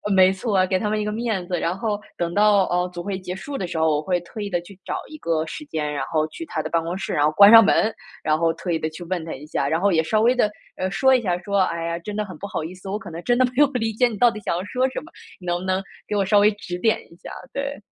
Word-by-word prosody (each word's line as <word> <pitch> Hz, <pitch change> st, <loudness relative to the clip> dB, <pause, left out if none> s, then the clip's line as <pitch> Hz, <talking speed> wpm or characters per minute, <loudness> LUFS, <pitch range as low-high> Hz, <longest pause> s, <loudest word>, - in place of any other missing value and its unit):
没 185 Hz, 0 st, +6 dB
错 200 Hz, +2 st, -2 dB
啊， 185 Hz, -, +4 dB
给 185 Hz, 0 st, 0 dB
他 210 Hz, -, -1 dB
们 215 Hz, 0 st, 0 dB
一 -, -, -1 dB
个 210 Hz, -, -1 dB
面 220 Hz, -4 st, -2 dB
子。 180 Hz, -1 st, -1 dB
然 170 Hz, +3 st, -1 dB
后 210 Hz, 0 st, -1 dB, 0.2 s
等 170 Hz, 0 st, -2 dB
到， 205 Hz, 0 st, +5 dB
呃， 180 Hz, 0 st, 0 dB
组 175 Hz, -1 st, -5 dB
会 195 Hz, -1 st, -3 dB
结 185 Hz, -1 st, -6 dB
束 275 Hz, +9 st, -6 dB
的 185 Hz, -, -3 dB
时 170 Hz, -, -5 dB
候， 160 Hz, 0 st, +3 dB
我 150 Hz, -, 0 dB
会 180 Hz, +3 st, 0 dB
特 175 Hz, +6 st, -10 dB
意 205 Hz, -1 st, -3 dB
地 175 Hz, -2 st, 0 dB
去 185 Hz, +2 st, -15 dB
找 -, -, -3 dB
一 310 Hz, -, -9 dB
个 165 Hz, -, -1 dB
时 300 Hz, -, -7 dB
间， 150 Hz, -, -3 dB
然 145 Hz, -, -2 dB
后 155 Hz, +2 st, 0 dB
去 330 Hz, -, -8 dB
他 -, -, -3 dB
的 -, -, -4 dB
办 165 Hz, -, +1 dB
公 170 Hz, +3 st, -3 dB
室， 195 Hz, -, -4 dB
然 145 Hz, -, +3 dB
后 150 Hz, -, +3 dB
关 200 Hz, +4 st, +8 dB
上 230 Hz, 0 st, +10 dB
门， 215 Hz, +2 st, +3 dB, 0.3 s
然 155 Hz, 0 st, +2 dB
后 165 Hz, -1 st, +2 dB
特 170 Hz, +2 st, -5 dB
意 165 Hz, -, +1 dB
地 155 Hz, -, -2 dB
去 155 Hz, +3 st, -9 dB
问 175 Hz, -1 st, -2 dB
他 165 Hz, -, -5 dB
一 140 Hz, -, -9 dB
下， 150 Hz, -, -1 dB
然 160 Hz, +4 st, 0 dB
后 200 Hz, +1 st, +3 dB
也 160 Hz, -3 st, +3 dB
稍 215 Hz, +7 st, +1 dB
微 240 Hz, +3 st, +5 dB
地， 245 Hz, -4 st, +2 dB, 0.3 s
呃， 185 Hz, +1 st, -1 dB
说 265 Hz, +8 st, +3 dB
一 255 Hz, -, +4 dB
下， 180 Hz, -5 st, 0 dB
说： 200 Hz, +2 st, -1 dB
“哎 170 Hz, -3 st, 0 dB
呀， 170 Hz, 0 st, -2 dB
真 205 Hz, +4 st, -6 dB
的 210 Hz, -, 0 dB
很 195 Hz, -3 st, -9 dB
不 200 Hz, -, -6 dB
好 195 Hz, -6 st, -3 dB
意 165 Hz, +3 st, -6 dB
思， 185 Hz, +1 st, -12 dB
我 200 Hz, -, -1 dB
可 220 Hz, -, -10 dB
能 165 Hz, +1 st, -6 dB
真 240 Hz, 0 st, +3 dB
的 255 Hz, -, +5 dB
没 -, -, -8 dB
有 295 Hz, 0 st, +6 dB
理 225 Hz, -3 st, 0 dB
解 245 Hz, +3 st, +3 dB
你 230 Hz, -, -5 dB
到 240 Hz, +3 st, +5 dB
底 215 Hz, -, -7 dB
想 205 Hz, -, -2 dB
要 180 Hz, -, -3 dB
说 255 Hz, +6 st, 0 dB
什 -, -, -5 dB
么， 325 Hz, -, -15 dB, 0.3 s
你 -, -, -11 dB
能 175 Hz, 0 st, 0 dB
不 185 Hz, -, -7 dB
能 190 Hz, +1 st, 0 dB, 0.2 s
给 210 Hz, -, -2 dB
我 200 Hz, -1 st, +2 dB
稍 205 Hz, +2 st, +4 dB
微 205 Hz, +1 st, +6 dB
指 180 Hz, -3 st, -6 dB
点 220 Hz, +3 st, +2 dB
一 -, -, -15 dB
下？” -, -, -10 dB, 0.2 s
对。 280 Hz, +1 st, -3 dB
190 Hz, 355 characters per minute, -23 LUFS, 170-215 Hz, 0.3 s, 上